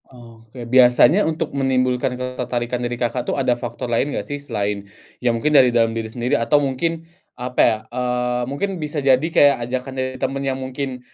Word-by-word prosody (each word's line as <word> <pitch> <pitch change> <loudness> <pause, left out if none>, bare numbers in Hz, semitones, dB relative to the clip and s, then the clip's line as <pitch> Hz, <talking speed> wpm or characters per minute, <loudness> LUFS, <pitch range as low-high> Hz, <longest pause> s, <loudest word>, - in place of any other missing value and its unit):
Oke, 115 -1 -12
biasanya 130 - +5
untuk 160 -1 -3
menimbulkan 130 -2 0
ketertarikan 125 -1 -3
dari 120 0 -3
Kakak 120 +1 -1
tuh - - -1
ada 130 -3 +2
faktor 120 +1 -5
lain 120 +4 0
gak - - -3
sih, 145 0 -5
selain 100 -6 -3 0.3
ya 125 - +2
mungkin 115 +7 0
dari 130 -4 +7
dalam 115 -1 +2
diri 115 -1 -4
sendiri 120 +2 -1
atau 130 +6 +2
mungkin 160 +4 -2 0.3
apa 125 0 -1
ya, 110 -2 +3
eee, 125 0 -1
mungkin 145 +9 -2
bisa 150 0 -3
jadi 135 -1 +3
kayak 145 -3 +4
ajakan 130 +1 -3
dari 130 0 -3
temen 135 +2 -2
yang 135 -1 -2
mungkin 130 0 -5
125 Hz, 185 wpm, -21 LUFS, 120-135 Hz, 0.3 s, dari